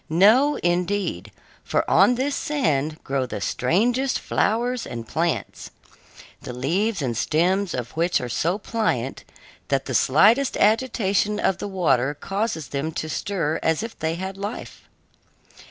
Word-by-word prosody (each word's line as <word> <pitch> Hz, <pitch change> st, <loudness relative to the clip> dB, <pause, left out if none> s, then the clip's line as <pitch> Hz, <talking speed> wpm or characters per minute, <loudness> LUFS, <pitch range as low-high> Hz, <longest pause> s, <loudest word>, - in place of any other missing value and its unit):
No, 220 Hz, -, +5 dB
indeed, 180 Hz, +3 st, -1 dB, 0.3 s
for -, -, 0 dB
on 250 Hz, -, +5 dB
this 270 Hz, +3 st, -1 dB
sand 155 Hz, -, -1 dB
grow 135 Hz, -1 st, -1 dB
the 120 Hz, -, -5 dB
strangest 235 Hz, -, +1 dB
flowers 240 Hz, +3 st, 0 dB
and 115 Hz, -1 st, -7 dB
plants, 170 Hz, +5 st, -2 dB, 0.7 s
the 125 Hz, -, -7 dB
leaves 170 Hz, -, -1 dB
and 120 Hz, -3 st, -1 dB
stems 180 Hz, -, +1 dB
of 120 Hz, -1 st, -4 dB
which 170 Hz, +2 st, +1 dB
are 125 Hz, -, -4 dB
so 165 Hz, -, 0 dB
pliant 205 Hz, -, -2 dB, 0.4 s
that -, -, 0 dB
the -, -, -4 dB
slightest 215 Hz, -, +4 dB
agitation 210 Hz, -2 st, +1 dB
of 190 Hz, -, +1 dB
the -, -, -4 dB
water 150 Hz, -8 st, +1 dB
causes 195 Hz, -, -3 dB
them 140 Hz, +4 st, -3 dB
to 155 Hz, -, -3 dB
stir 165 Hz, -3 st, -2 dB
as 160 Hz, +6 st, +1 dB
if 230 Hz, 0 st, -6 dB
they 160 Hz, +1 st, -1 dB
had 190 Hz, +2 st, -5 dB
life. 205 Hz, +3 st, -7 dB
185 Hz, 140 wpm, -23 LUFS, 150-220 Hz, 0.7 s, No